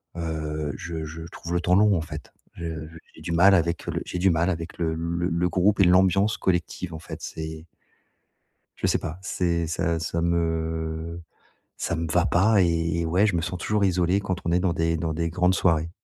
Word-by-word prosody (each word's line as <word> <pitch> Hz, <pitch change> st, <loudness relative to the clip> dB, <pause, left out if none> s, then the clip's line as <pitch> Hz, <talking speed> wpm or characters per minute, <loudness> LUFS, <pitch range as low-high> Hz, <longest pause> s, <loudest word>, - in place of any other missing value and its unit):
heu, 75 Hz, -3 st, -3 dB
je 80 Hz, +3 st, -5 dB
je 80 Hz, +1 st, -8 dB
trouve 85 Hz, -, -6 dB
le 85 Hz, -, +1 dB
temps 90 Hz, +1 st, +3 dB
long, 105 Hz, -1 st, +5 dB
en -, -, -1 dB
fait. 75 Hz, -2 st, -8 dB, 0.2 s
Je 85 Hz, -, -7 dB, 0.2 s
je 80 Hz, +1 st, -13 dB, 0.2 s
j'ai -, -, -14 dB
du -, -, -4 dB
mal 95 Hz, +4 st, +6 dB
avec 85 Hz, -1 st, 0 dB
le -, -, -1 dB
j'ai 90 Hz, -, -4 dB
du 95 Hz, +2 st, +4 dB
mal 85 Hz, +1 st, +2 dB
avec 85 Hz, -1 st, -5 dB
le 80 Hz, -2 st, 0 dB
le 85 Hz, +2 st, -2 dB
le 85 Hz, +1 st, +1 dB
groupe 95 Hz, +4 st, +2 dB
et -, -, +7 dB
l'ambiance 95 Hz, +3 st, +4 dB
collective 90 Hz, -1 st, -1 dB
en 80 Hz, -, -6 dB
fait, 85 Hz, -, -8 dB
c'est 80 Hz, 0 st, -6 dB, 1.1 s
je -, -, -1 dB
sais -, -, +2 dB
pas, 80 Hz, +2 st, -6 dB
c'est 85 Hz, -3 st, 0 dB
ça 85 Hz, 0 st, -1 dB
ça 80 Hz, +1 st, -2 dB
me 80 Hz, -1 st, -1 dB, 0.6 s
ça 85 Hz, -, -2 dB
me 80 Hz, -1 st, -3 dB
va -, -, +3 dB
pas 100 Hz, +3 st, +4 dB
et 85 Hz, -1 st, +1 dB
et 85 Hz, -, -1 dB
ouais, 90 Hz, +6 st, +3 dB
je 100 Hz, -5 st, +1 dB
me 85 Hz, -, 0 dB
sens 90 Hz, +2 st, -3 dB
toujours 105 Hz, +3 st, 0 dB
isolé 90 Hz, +1 st, +2 dB
quand 95 Hz, -2 st, -2 dB
on 85 Hz, -, 0 dB
est 90 Hz, -, +3 dB
dans 90 Hz, -2 st, +1 dB
des 80 Hz, -1 st, 0 dB
dans 80 Hz, 0 st, -2 dB
des 85 Hz, +1 st, -1 dB
grandes 90 Hz, +2 st, +2 dB
soirées. 85 Hz, -3 st, +2 dB
85 Hz, 215 wpm, -25 LUFS, 80-90 Hz, 1.1 s, et